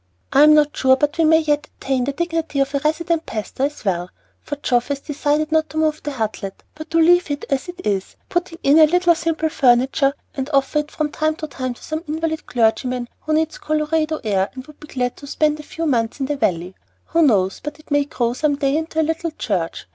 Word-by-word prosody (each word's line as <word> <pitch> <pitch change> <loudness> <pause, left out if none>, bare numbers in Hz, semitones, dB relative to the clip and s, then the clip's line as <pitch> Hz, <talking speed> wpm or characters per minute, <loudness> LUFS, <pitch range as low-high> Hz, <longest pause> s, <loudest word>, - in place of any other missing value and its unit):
I 275 - +6
am 305 +1 +8
not 295 -1 +3
sure 260 0 +4
but 295 +3 -1
we 325 - +5
may 320 +1 +5
yet 295 -1 0
attain 265 -2 -1
to 280 - -1
the - - -16
dignity 330 -4 -2
of 275 +1 +1
a 280 - +1
'resident 320 +3 0
pastor' 225 +5 -2
as 290 -5 -6
well, 180 -2 -1 0.3
for 290 - -5
Geoff 245 -4 0
has 285 -1 -2
decided 295 +1 -1
not 315 0 +2
to 315 - -7
move 310 -1 +1
the 295 - -4
Hutlet, 215 -5 -4
but 310 +1 -10
leave 345 +1 +5
it 285 0 -3
as 275 +5 0
it 360 +1 -9
is, 195 -2 -1
putting 350 -2 -2
in 285 +3 +5
a 310 - +8
little 355 +1 +4
simple 325 -1 -1
furniture, 270 +1 +3 0.2
and 270 +1 -4
offer 275 +2 +2
it 300 0 -4
from 305 -1 -2
time 310 +1 0
to 315 - -5
time 255 -3 -4
to - - -17
some 315 +1 -4
invalid 315 +1 -3
clergyman 245 +1 0
who 310 - -3
needs 315 0 0
Colorado 310 +1 0
air 195 -3 +1
and 260 0 -8
would 300 -1 -16
be 300 - -12
glad 250 -3 -2
to 285 - -11
spend 300 +1 +1
a - - -5
few 325 +2 -5
months 235 -4 0
in 270 - 0
the 290 +2 -1
Valley. 180 -8 -1 0.4
Who 335 - +2
knows 195 - +3
but 295 0 -5
it 305 - -20
may 290 0 +3
grow 240 -4 -1
some 290 +3 +1
day 275 0 0
into 320 0 -3
a - - +4
little 325 +1 -2
church? 190 - -3
295 Hz, 235 wpm, -20 LUFS, 260-315 Hz, 0.4 s, am